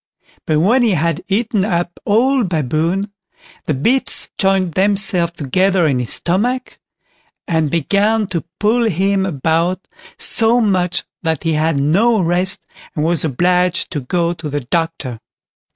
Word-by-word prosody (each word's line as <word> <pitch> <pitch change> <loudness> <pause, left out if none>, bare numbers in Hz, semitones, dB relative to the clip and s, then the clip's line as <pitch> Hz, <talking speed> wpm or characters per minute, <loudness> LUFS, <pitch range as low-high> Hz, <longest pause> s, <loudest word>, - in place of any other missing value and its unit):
But 155 -1 +2
when 225 +10 +3
he 225 -6 +2
had 165 +1 -1
eaten 215 0 0
up 175 -3 -2
all 250 +5 +2
Baboon, 170 - -1 0.5
the 155 - -1
bits 240 - 0
joined 190 -3 +1
themselves 190 -3 +3
together 185 +5 +1
in 135 -5 +1
his 125 - -3
stomach, 245 +9 -1 0.7
and 160 -3 0
began 200 +8 +1
to 170 -4 -3 0.2
pull 230 +3 +2
him 195 0 0
about 165 +4 -1 0.3
so 230 +1 +4
much 185 -5 0 0.2
that 160 -3 -2
he 165 -1 0
had 155 -1 0
no 205 +11 +2
rest, 180 +2 0 0.3
and 150 -1 -1
was 170 0 +1
obliged 180 +5 0
to 155 - -2
go 170 +6 -1
to 160 -2 -8
a 145 0 -2
doctor. 145 -3 -3
180 Hz, 140 wpm, -17 LUFS, 160-200 Hz, 0.7 s, so